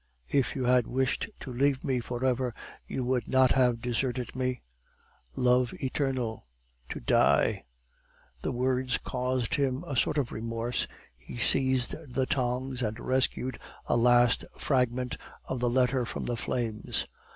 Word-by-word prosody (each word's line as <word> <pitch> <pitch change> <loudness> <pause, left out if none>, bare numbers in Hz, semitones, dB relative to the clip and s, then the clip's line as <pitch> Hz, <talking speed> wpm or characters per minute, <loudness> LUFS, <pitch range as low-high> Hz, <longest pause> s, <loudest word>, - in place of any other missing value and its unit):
If 140 -2 +2
you 130 - -1
had 125 -1 +3
wished 130 +1 0
to 130 - -6
leave 135 +1 +2
me 130 -3 +1
for 120 +2 -3
ever, 125 -2 0 0.3
you 130 - -2
would 125 -2 0
not 130 -1 +4
have 125 -3 +3
deserted 125 0 -2
me 130 -1 -2 0.7
Love 125 -1 +3
eternal 130 - -2 0.4
To - - -4
die - - +3 0.4
" 60 - -33
The - - -1
words 125 0 +1
caused 125 -2 -2
him 135 -2 0
a 140 - -4
sort 150 - +2
of 135 -5 0
remorse; 115 +2 -2 0.3
he 65 - -10
seized 130 0 +2 0.2
the 130 +1 +1
tongs, 130 0 -1
and 110 -1 -2
rescued 130 -1 0 0.3
a - - +1
last 120 0 +4
fragment 125 -2 0 0.3
of 130 - -3
the 120 0 +2
letter 125 +1 +2
from - - -4
the 120 - -1
flames. 115 -2 -1
125 Hz, 150 wpm, -29 LUFS, 120-130 Hz, 0.7 s, not